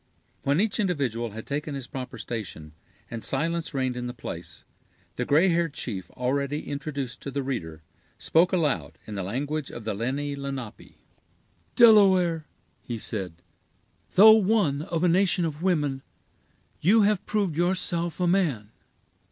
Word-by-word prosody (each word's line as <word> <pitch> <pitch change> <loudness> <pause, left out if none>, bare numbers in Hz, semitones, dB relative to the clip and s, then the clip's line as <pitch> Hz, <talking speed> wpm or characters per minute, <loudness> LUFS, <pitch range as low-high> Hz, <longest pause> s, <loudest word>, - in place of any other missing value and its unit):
When 140 +3 +1
each 220 +2 +1
individual 135 - -1
had 110 +2 -8
taken 145 +1 -3
his 135 -3 -5
proper 130 0 -7
station, 85 -9 -6 0.4
and 115 -1 -5
silence 165 +4 -1
reigned 130 -3 -1
in 125 0 -4
the 125 - -6
place, 85 -7 -8 0.5
the - - -2
gray 160 +6 +4
haired 165 -3 0
chief 95 - -5
already 140 +4 -1
introduced 140 -3 -4
to - - -5
the 140 0 -3
reader, 80 -12 -5 0.3
spoke 170 +3 +3
aloud, 165 -6 0
in 110 - -8
the 100 - -3
language 140 +9 -3
of 120 - -8
the 110 - -2
Lenni 135 +7 -2
Lenape. 135 -5 -7 0.8
"Delaware," 190 -8 +5 0.3
he 120 - -5
said, 90 -6 -3 0.7
"though 215 +4 +10
one 200 -9 +2
of 165 +1 -2
a - - +5
nation 175 -1 +3
of 155 -1 -4
women, 150 -7 0 0.8
you 210 +6 +5
have 205 -1 +2
proved 200 -7 0
yourself 175 -1 0
a 180 - +1
man. 155 - +1
145 Hz, 150 wpm, -26 LUFS, 125-175 Hz, 0.8 s, though